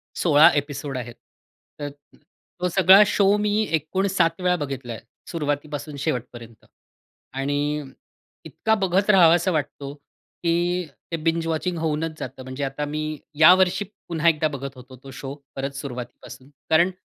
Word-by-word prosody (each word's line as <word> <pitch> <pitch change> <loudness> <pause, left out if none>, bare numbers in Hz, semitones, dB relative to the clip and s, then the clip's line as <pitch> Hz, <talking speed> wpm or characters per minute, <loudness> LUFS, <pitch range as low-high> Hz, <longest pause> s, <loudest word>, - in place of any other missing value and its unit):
16 155 -2 +6
episode 145 -2 -3
आहेत. 120 -1 -6 0.7
तर 145 - -4 0.3
अ, - - -21 0.4
तो 180 - +2
सगळा 190 +2 +7
शो 200 0 +3
मी 210 +1 +1
एकूण 160 +6 0
7 170 -2 +1
वेळा 180 0 +2
बघितला 135 -6 -5
आहे - - -9 0.3
सुरुवातीपासून 145 -2 -3
शेवटपर्यंत. 120 -5 -5 0.7
आणि 145 +2 -1 0.6
इतका 220 0 0
बघत 195 +1 +1
राहावासा 175 -1 +5
वाटतो 145 -2 -3 0.5
की 175 +1 +1 0.3
ते 165 - -1
बिंज 165 0 0
वॉचिंग 165 +2 -1
होऊनच 160 0 -2
जातं. 130 0 -7
म्हणजे 130 +2 -5
आता 135 +2 -3
मी 155 0 -4 0.2
या 160 +3 +9
वर्षी 190 +2 +1 0.2
पुन्हा 170 0 0
एकदा 155 -1 +1
बघत 140 -2 -6
होतो 130 +1 -13
तो 135 - -10
शो 135 +1 -7 0.2
परत 135 +1 -3
सुरुवातीपासून. 125 0 -8 0.2
कारण 170 +4 +4
155 Hz, 145 wpm, -23 LUFS, 140-175 Hz, 0.7 s, या